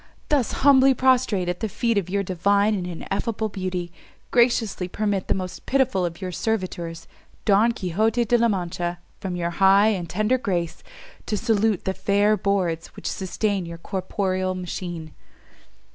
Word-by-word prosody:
Thus 280 -6 +1
humbly 270 -1 +6
prostrate 250 -8 +2
at 180 0 -2
the 220 - -2
feet 230 +3 0
of 195 -3 0
your 200 +1 0
divine 200 +3 +2
and 185 -3 -2
ineffable 205 +5 -3
beauty, 185 -3 -4 0.4
graciously 235 -6 +2
permit 205 0 -1
the - - +1
most 185 -1 -6
pitiful 260 -9 +2
of 170 0 -8
your 185 -2 -4
servitors, 180 -5 -3 0.4
Don 215 +3 +4
Quixote 220 +4 0
De 240 - +2
la 235 0 +4
Mancha, 175 -3 -2 0.2
from 185 -2 -4
your 170 -1 -2
high 195 +3 +5
and 180 -6 -2
tender 215 +8 +1
grace, 175 -7 -2 0.5
to 210 - 0
salute 220 -3 +1
the 190 - 0
fair 200 +2 +2
boards 185 -4 -1
which - - -12
sustain 195 -1 -2
your 170 0 -7
corporeal 185 0 -2
machine." 175 -3 -6
195 Hz, 155 wpm, -24 LUFS, 180-220 Hz, 0.5 s, humbly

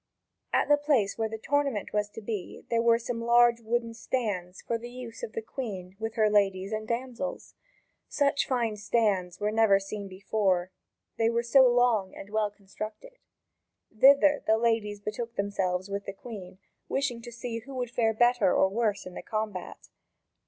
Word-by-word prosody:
At - - +2
the 290 - +5
place 280 -9 +1
where 225 -1 -1
the 220 - -5
tournament 275 -3 -1
was 210 0 0
to 225 - -9
be, 210 -3 -5
there 230 0 +3
were 230 0 +5
some 230 0 -4
large 235 0 +4
wooden 230 +1 -1
stands 205 -7 -3
for 230 -1 -2
the 240 +1 -8
use 245 -2 -9
of 215 - -6
the 225 - -4
Queen 195 -7 -6
with 225 0 -4
her 215 -1 +4
ladies 195 -2 +2
and 215 0 -3
damsels. 250 +3 -4 0.6
Such 280 -1 +1
fine 235 -5 0
stands 200 -5 0
were 210 0 0
never 220 -3 +4
seen 200 +1 -6
before 190 -1 0 0.5
they 225 0 +4
were 235 0 0
so 260 +2 +6
long 240 -6 +2
and 200 - -10
well 215 -1 +1
constructed. 215 - -9 0.8
Thither 280 +5 +6
the 220 - +4
ladies 225 -3 0
betook 230 +3 -5
themselves 190 -2 -1
with 200 0 -4
the 195 - -5
Queen, 195 -4 -9 0.3
wishing 270 -4 -1
to 240 - -9
see 235 0 -5
who 265 +4 -10
would 245 -2 -3
fare 225 -3 +1
better 240 -4 +4
or 190 - +4
worse 210 -1 -1
in 185 - -8
the - - -6
combat. 215 -4 -5
225 Hz, 175 wpm, -28 LUFS, 200-240 Hz, 0.8 s, so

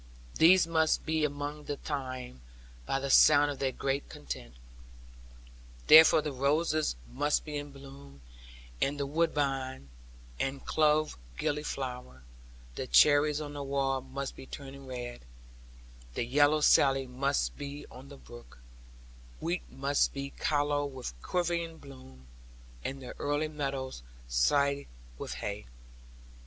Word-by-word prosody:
These 175 +2 +7
must 160 -1 +1
be 160 -1 0
among 145 0 -3
the 145 - -4
thyme, 130 - -5 0.5
by 135 - 0
the 135 0 -2
sound 145 +1 +6
of 140 - -7
their 135 -1 0
great 135 +2 -2
content. - - -8 1.3
Therefore 160 -1 +8
the 150 - -3
roses 150 - +1 0.2
must 145 - +1
be 150 -1 -6
in 145 0 -4
blossom, 135 - -13 0.6
and 145 +1 0
the 140 - 0
woodbine, 140 - -1 0.5
and 135 0 -3
clove 155 - +2 0.2
gilly 150 +1 -1
flower; 125 - -6 0.5
the - - -5
cherries 145 - +5
on 145 -1 -6
the 145 - -5
wall 135 -1 0
must 135 +1 -6
be 135 - -11
turning 135 -1 -9
red, 120 -1 -6 0.9
the - - -1
yellow 145 +4 +3
Sally 135 -2 +4
must 135 +3 -1
be 145 0 -7
on 130 +2 -12
the 140 - -11
brook, 120 -2 -14 0.8
wheat 175 +2 -3
must 140 +1 +1
be 140 0 -4
callow 145 -1 0
with 130 - -6
quavering 170 - -1
bloom, 130 - -14 0.6
and 135 0 -5
the 125 - -7
early 145 +2 -1
meadows 135 - -4 0.3
swathed 140 - +2 0.3
with - - -5
hay. - - -5
140 Hz, 130 wpm, -30 LUFS, 130-150 Hz, 1.3 s, Therefore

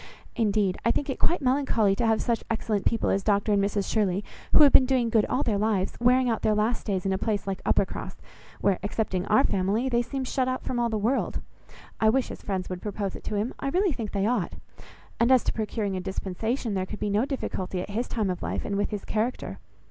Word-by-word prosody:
Indeed 205 -4 +1
I - - +2
think 275 +3 0
it - - -6
quite 340 -4 +1
melancholy 250 -6 +2
to 240 - +1
have 220 -1 +2
such 235 -2 0
excellent 220 -3 -1
people 230 - +1
as 195 - +1
Dr 205 +1 +2
and 200 -1 +3
Mrs 200 0 -1
Shirley, 200 -3 +1 0.3
who - - +8
have 285 - +7
been 260 - +7
doing 250 -3 +1
good 220 -2 +3
all 270 - 0
their 210 -4 0
lives, 205 -3 +1
wearing 250 +2 +4
out 230 -2 0
their 215 - +2
last 220 +3 0
days 190 -3 -1
in 195 - +1
a 190 - -1
place 210 -3 -1
like 195 -1 -3
Uppercross, - - -1 0.4
where, 195 -2 +2
excepting 200 -3 -2
our 220 +6 +4
family, 205 +4 +1
they 240 -1 +2
seem 270 +2 -4
shut 255 0 0
out 255 0 -2
from 245 - -2
all 235 0 +1
the 220 - -1
world. 230 +6 0 0.6
I 220 - +4
wish 260 +3 +1
his - - -8
friends 190 -2 -3
would 180 -1 -5
propose 205 -2 -3
it - - -10
to 210 - -3
him. 215 +5 -1
I 275 - -2
really 365 +2 +2
think 225 -4 -5
they 200 -1 0
ought. 220 -6 0 0.7
And, 235 +2 +4
as 260 -2 +5
to - - -1
procuring 215 -2 -2
a - - -2
dispensation, 205 +5 -3
there 190 -1 -1
could 215 - -6
be 210 - -1
no 210 +5 +2
difficulty 190 -9 -3
at 185 - -5
his 235 +4 -2
time 215 -5 -1
of 180 - -5
life, - - -3
and 200 - -2
with 205 - 0
his 210 -2 -5
character. 225 +4 -2
215 Hz, 240 wpm, -26 LUFS, 200-245 Hz, 0.7 s, who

